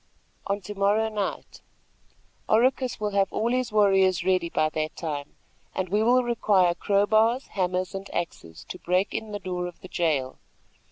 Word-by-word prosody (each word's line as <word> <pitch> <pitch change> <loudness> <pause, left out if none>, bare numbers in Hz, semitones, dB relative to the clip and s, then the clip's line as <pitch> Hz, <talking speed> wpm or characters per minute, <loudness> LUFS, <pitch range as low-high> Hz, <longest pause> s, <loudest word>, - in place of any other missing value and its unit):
"On 200 +1 0
to 200 +2 -7
morrow 205 +2 +2
night. 210 -2 -4 0.9
Oracus 255 +3 +2
will 210 -1 -1
have 195 -1 +1
all 230 +2 0
his 255 -2 0
warriors 195 -4 +3
ready 185 -2 +1
by 155 - +1
that 155 0 -3
time, 145 -3 -5 0.4
and 185 -1 -2
we 205 +3 +2
will 250 +3 +4
require 205 -7 +2
crow 200 +3 +1
bars, 225 +5 +2
hammers 185 -1 -1
and 195 +1 -6
axes, 85 - -5
to 180 - -7
break 185 +3 0
in 220 -1 -4
the 205 - -3
door 180 -2 -4
of 175 - -11
the 185 - -9
jail. 150 -8 -1
195 Hz, 170 wpm, -26 LUFS, 180-215 Hz, 0.9 s, will